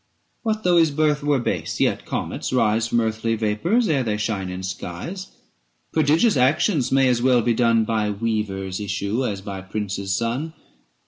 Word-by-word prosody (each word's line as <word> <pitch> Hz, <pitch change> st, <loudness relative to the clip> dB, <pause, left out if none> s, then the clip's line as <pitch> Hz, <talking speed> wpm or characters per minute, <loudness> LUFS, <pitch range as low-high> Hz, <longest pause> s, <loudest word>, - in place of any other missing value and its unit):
635 -, -, -46 dB
What 215 Hz, -, -15 dB
though 180 Hz, -1 st, +4 dB
his 165 Hz, -1 st, +4 dB
birth 150 Hz, 0 st, +1 dB
were 145 Hz, -1 st, +2 dB
base, 120 Hz, -, -2 dB
yet -, -, 0 dB
comets -, -, -3 dB
rise 115 Hz, -3 st, +2 dB
From 120 Hz, 0 st, +1 dB
earthy 110 Hz, 0 st, -1 dB
vapours, 115 Hz, -, +1 dB
ere 145 Hz, -5 st, +2 dB
they 110 Hz, -4 st, -1 dB
shine 105 Hz, -3 st, -2 dB
in 90 Hz, +1 st, -6 dB
skies. 95 Hz, -, -6 dB, 0.7 s
Prodigious 160 Hz, +8 st, +3 dB
actions 140 Hz, -, +2 dB
may 135 Hz, 0 st, +4 dB
as 120 Hz, -2 st, +2 dB
well 125 Hz, -2 st, +3 dB
be 120 Hz, -, +2 dB
done 115 Hz, -1 st, +3 dB
By 110 Hz, -1 st, 0 dB
weaver's 100 Hz, -3 st, -2 dB
issue 100 Hz, +4 st, -2 dB
as 100 Hz, -6 st, -3 dB
by 100 Hz, -1 st, -6 dB
prince's 100 Hz, -1 st, -3 dB
son. 125 Hz, +8 st, -2 dB
115 Hz, 175 wpm, -22 LUFS, 105-145 Hz, 0.7 s, though